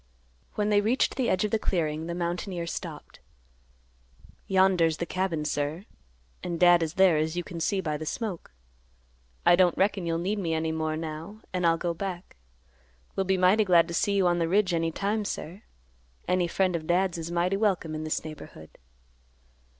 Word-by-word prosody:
When 210 Hz, 0 st, 0 dB
they 205 Hz, -1 st, +4 dB
reached 230 Hz, +5 st, +1 dB
the 255 Hz, -3 st, 0 dB
edge 185 Hz, +3 st, +1 dB
of 210 Hz, -, -3 dB
the 220 Hz, -, +1 dB
clearing, 160 Hz, -5 st, -1 dB
the 170 Hz, -, -4 dB
mountaineer 175 Hz, 0 st, -3 dB
stopped. 170 Hz, -, -7 dB, 1.3 s
"Yonder's 185 Hz, -4 st, +3 dB
the 170 Hz, -, -2 dB
cabin, 170 Hz, -4 st, -2 dB
sir, 150 Hz, +5 st, -2 dB, 0.6 s
an' 175 Hz, -1 st, -3 dB
Dad 175 Hz, 0 st, +6 dB
is 165 Hz, +1 st, -2 dB
there, 190 Hz, -4 st, +5 dB
as 160 Hz, +2 st, -1 dB
you 175 Hz, -, -1 dB
can 170 Hz, -1 st, -8 dB
see 190 Hz, +4 st, 0 dB
by 155 Hz, -4 st, -2 dB
the 155 Hz, -, -6 dB
smoke. 205 Hz, -4 st, -4 dB, 0.9 s
I 175 Hz, -, +7 dB
don't 180 Hz, -1 st, +3 dB
reckon 195 Hz, -2 st, +1 dB
you'll 165 Hz, 0 st, 0 dB
need 195 Hz, +5 st, -1 dB
me 165 Hz, -4 st, -1 dB
any 160 Hz, 0 st, -1 dB
more 155 Hz, -1 st, -2 dB
now, 160 Hz, +7 st, -7 dB
an' 180 Hz, -1 st, 0 dB
I'll 165 Hz, 0 st, +4 dB
go 170 Hz, 0 st, -2 dB
back. 180 Hz, 0 st, -6 dB, 0.8 s
We'll 195 Hz, -, 0 dB
be 190 Hz, 0 st, +2 dB
mighty 185 Hz, +4 st, +4 dB
glad 175 Hz, -4 st, +4 dB
to -, -, -5 dB
see 200 Hz, +4 st, +1 dB
you 195 Hz, -2 st, +3 dB
on 175 Hz, -1 st, +2 dB
the 165 Hz, -1 st, 0 dB
ridge 190 Hz, -1 st, +2 dB
any 165 Hz, -1 st, 0 dB
time, 205 Hz, +5 st, -1 dB
sir. 190 Hz, -1 st, -6 dB, 0.7 s
Any 180 Hz, -1 st, +2 dB
friend 185 Hz, +1 st, +1 dB
of 155 Hz, -2 st, -4 dB
Dad's 180 Hz, 0 st, +1 dB
is 165 Hz, 0 st, -5 dB
mighty 175 Hz, +2 st, 0 dB
welcome 190 Hz, -7 st, 0 dB
in 155 Hz, 0 st, -4 dB
this 155 Hz, 0 st, -2 dB
neighborhood." 150 Hz, -, -11 dB
175 Hz, 190 wpm, -27 LUFS, 165-190 Hz, 1.3 s, I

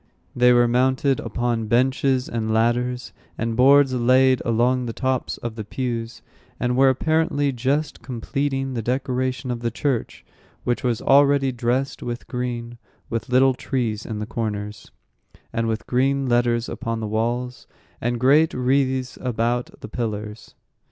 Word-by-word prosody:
They 125 Hz, 0 st, +5 dB
were 120 Hz, 0 st, +5 dB
mounted 130 Hz, +2 st, +2 dB
upon 115 Hz, 0 st, -2 dB
benches 130 Hz, +2 st, +2 dB
and 110 Hz, -1 st, -2 dB
ladders, 120 Hz, +3 st, 0 dB, 0.2 s
and 115 Hz, 0 st, -2 dB
boards 135 Hz, +2 st, +5 dB
laid 130 Hz, +1 st, +4 dB
along 120 Hz, +2 st, +1 dB
the 115 Hz, -, -4 dB
tops 130 Hz, 0 st, -2 dB
of 120 Hz, -1 st, -5 dB
the 110 Hz, -1 st, -6 dB
pews, 115 Hz, +1 st, -4 dB, 0.4 s
and 125 Hz, 0 st, 0 dB
were 135 Hz, +1 st, +5 dB
apparently 145 Hz, +1 st, +1 dB
just 135 Hz, +5 st, -1 dB
completing 135 Hz, +2 st, -2 dB
the 120 Hz, -, -2 dB
decoration 130 Hz, +1 st, -2 dB
of 120 Hz, -, -3 dB
the 120 Hz, 0 st, -1 dB
church, 125 Hz, +1 st, -3 dB, 0.4 s
which 120 Hz, -, -1 dB
was 120 Hz, -3 st, -1 dB
already 140 Hz, -1 st, +4 dB
dressed 125 Hz, +3 st, -1 dB
with 120 Hz, 0 st, -5 dB
green, 120 Hz, -2 st, -4 dB, 0.3 s
with 115 Hz, +1 st, -3 dB
little 130 Hz, +1 st, +4 dB
trees 120 Hz, -5 st, -2 dB
in 110 Hz, -, -5 dB
the 105 Hz, -, -3 dB
corners, 105 Hz, -2 st, -4 dB, 0.6 s
and 115 Hz, 0 st, 0 dB
with 110 Hz, 0 st, -2 dB
green 135 Hz, +2 st, +1 dB
letters 120 Hz, -1 st, +1 dB
upon 115 Hz, 0 st, -4 dB
the 110 Hz, -, -3 dB
walls, 120 Hz, +3 st, -2 dB, 0.3 s
and 120 Hz, 0 st, -1 dB
great 145 Hz, +6 st, +4 dB
wreaths 130 Hz, 0 st, 0 dB
about 120 Hz, 0 st, -2 dB
the -, -, -7 dB
pillars. 105 Hz, -2 st, -5 dB
125 Hz, 145 wpm, -23 LUFS, 115-130 Hz, 0.6 s, They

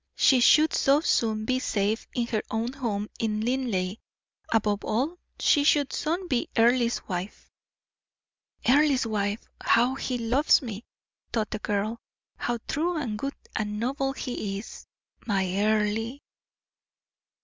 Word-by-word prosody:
She 260 Hz, -, +5 dB
should 305 Hz, +6 st, +5 dB
so 275 Hz, +2 st, +4 dB
soon 220 Hz, -8 st, +1 dB
be 255 Hz, +2 st, +1 dB
safe 215 Hz, -3 st, -1 dB
in 240 Hz, -2 st, +1 dB
her 220 Hz, -2 st, -1 dB
own 230 Hz, +3 st, -2 dB
home 215 Hz, -6 st, -2 dB
in 215 Hz, -1 st, -1 dB
Linleigh; 220 Hz, -6 st, -1 dB, 0.5 s
above 210 Hz, -2 st, +1 dB
all, 280 Hz, +11 st, -1 dB, 0.2 s
she 290 Hz, -, +4 dB
should 290 Hz, -2 st, +3 dB
soon 345 Hz, +4 st, -2 dB
be 250 Hz, -6 st, 0 dB
Earle's 235 Hz, +1 st, +3 dB
wife. 185 Hz, +1 st, -5 dB, 1.2 s
"Earle's 275 Hz, 0 st, +4 dB
wife 205 Hz, -1 st, -2 dB, 0.2 s
how 245 Hz, +3 st, +4 dB
he 260 Hz, -1 st, -3 dB
loves 250 Hz, +6 st, +3 dB
me!" 225 Hz, -2 st, -6 dB, 0.5 s
thought 220 Hz, -3 st, -1 dB
the 215 Hz, -, -3 dB
girl, 210 Hz, +3 st, -2 dB, 0.4 s
"how 240 Hz, 0 st, -2 dB
true 335 Hz, +3 st, 0 dB
and 245 Hz, -8 st, -2 dB
good 275 Hz, +3 st, -3 dB, 0.2 s
and 210 Hz, -1 st, -2 dB
noble 270 Hz, +3 st, -1 dB
he 215 Hz, -7 st, -4 dB
is, 205 Hz, -, -10 dB, 0.4 s
my 195 Hz, -3 st, +1 dB
Earle!" 215 Hz, +3 st, +1 dB
235 Hz, 135 wpm, -27 LUFS, 215-270 Hz, 1.2 s, She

